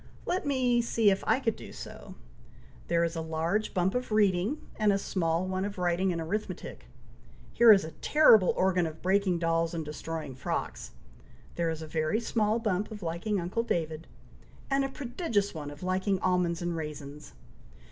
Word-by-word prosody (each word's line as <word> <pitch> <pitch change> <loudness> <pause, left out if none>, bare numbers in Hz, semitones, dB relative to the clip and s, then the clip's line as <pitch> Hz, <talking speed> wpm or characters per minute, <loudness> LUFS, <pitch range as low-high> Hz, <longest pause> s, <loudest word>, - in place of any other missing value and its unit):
Let 365 -3 -1
me 250 -3 +2
see 230 -3 +3
if 195 - -1
I - - +3
could 230 -4 0
do - - -11
so! - - -10 0.7
There 170 0 +2
is 170 0 -1
a 165 - -2
large 165 +6 -1
bump 185 +1 +2
of 250 -2 -3
reading, 210 +5 +2 0.2
and 210 -1 +3
a 195 - +2
small 170 -3 -1
one 185 0 -2
of 200 0 -4
writing 180 +1 +1
and 170 - -2
arithmetic. 205 +7 -4 0.7
Here 235 -1 +8
is 195 -2 +6
a 160 - -7
terrible 220 - +5
organ 185 -2 +2
of 160 0 -10
breaking 190 -1 +2
dolls 165 0 0
and 160 -2 -3
destroying 155 -1 -5
frocks. 125 - -4 0.6
There 170 -1 -1
is 160 0 -4
a - - -7
very 155 +6 0
small 220 -2 +1
bump 210 -3 -1
of 210 -3 -8
liking 175 +5 -1
uncle 180 +6 -1
David, 160 -7 -2 0.6
and 275 0 +3
a 270 - -1
prodigious 245 - -2
one 150 -3 -6
of 145 +4 -10
liking 190 +1 0
almonds 180 -2 +1
and 175 -1 -2
raisins!" 150 -2 -7
185 Hz, 180 wpm, -29 LUFS, 165-215 Hz, 0.7 s, Here